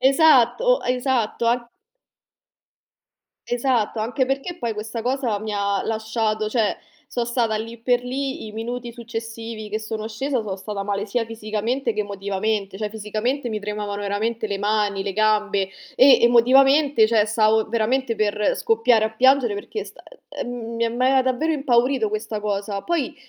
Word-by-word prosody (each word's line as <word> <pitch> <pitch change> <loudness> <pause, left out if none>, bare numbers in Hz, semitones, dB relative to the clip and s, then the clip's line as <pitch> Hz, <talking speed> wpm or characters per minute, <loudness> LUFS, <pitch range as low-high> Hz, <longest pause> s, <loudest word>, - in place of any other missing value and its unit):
Esatto, 315 - +4
esatto. 250 -3 0
A 240 0 0 1.8
Esatto. 240 -3 0
Anche 250 +4 0
perché 275 +7 -3
poi 235 -6 -2
questa 220 +2 -5
cosa 250 -4 -1
mi 215 0 -5
ha 200 -1 0
lasciato, 220 -1 -1
cioè 220 -2 0 0.3
so 240 - -2
stata, 235 -2 0
lì 225 +2 -5
per 245 +1 +1
lì, 265 0 -4
i - - -10
minuti 240 +2 -5
successivi 230 -2 -7
che 215 +1 -2
sono 220 0 -5
scesa, 255 +2 -2
sono 195 -2 -4
stata 200 +1 -5
male 205 +1 -2
sia 230 +3 -1
fisicamente 225 +3 -2
che 215 - -2
emotivamente. 200 0 -2
Cioè, 210 +1 -3
fisicamente 220 +5 -2
mi 215 -2 -3
tremavano 205 0 -4
veramente 220 +3 -2
le 200 -1 -2
mani, 205 -1 0
le 200 - -2
gambe, 210 -2 +1 0.3
e 265 +1 +7
emotivamente, 265 +2 +5
cioè, 215 -2 +3
stavo 220 0 +2
veramente 230 +2 0
per 210 0 +1
scoppiare 225 0 +3
a 220 - -1
piangere, 260 -2 +4
perché 315 - -5
st - - -14 0.5
uhm, - - -6 0.3
ehm, 230 0 0
mi 250 - +1
aveva 265 0 +4
davvero 260 +5 0
impaurito 255 -4 +2
questa 215 0 -4
cosa. 200 -1 -3
Poi 335 -7 -1
225 Hz, 155 wpm, -22 LUFS, 210-250 Hz, 1.8 s, e